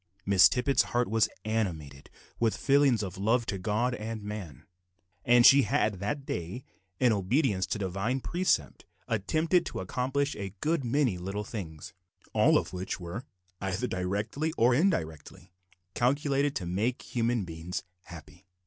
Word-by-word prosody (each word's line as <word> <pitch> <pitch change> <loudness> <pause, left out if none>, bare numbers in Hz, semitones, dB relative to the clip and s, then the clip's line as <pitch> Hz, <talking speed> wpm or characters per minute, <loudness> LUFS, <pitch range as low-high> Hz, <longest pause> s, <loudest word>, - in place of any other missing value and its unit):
Miss 100 -2 +7
Tippet's 130 +2 +2 0.2
heart 120 - +2
was 110 +1 +2 0.2
animated 80 -11 -3 0.3
with 115 -2 +1
feelings 135 -5 +3
of 95 -1 -6
love 115 +4 +2
to 100 -4 -3
God 110 +6 0
and 110 -1 -5
man; 105 - -7 0.6
and 120 0 +5
she 140 +1 +9
had 110 -8 0
that 135 +8 -3
day, 90 +7 -5 0.4
in 125 -2 +4
obedience 100 - +1
to - - -2
the 100 - -2
Divine 100 +8 -1
precept, 170 - -1 0.2
attempted 155 - +1
and - - -2
accomplished 135 +7 -1
a 100 0 -6
good 160 -2 0
many 120 -6 +1
little 100 +3 -4
things, 85 -8 -7 0.4
all - - +5
of - - -3
which 90 +1 -4
were, 90 +9 -6 0.4
either 95 +5 -2
directly 105 - -2
or 120 +2 +4
indirectly, 90 - -1 0.4
calculated 140 +2 +1
to 90 - -3
make 105 +8 -1
human 115 -3 -1
beings 85 +2 -5 0.2
happy. 85 +2 -13
110 Hz, 150 wpm, -29 LUFS, 95-125 Hz, 0.6 s, she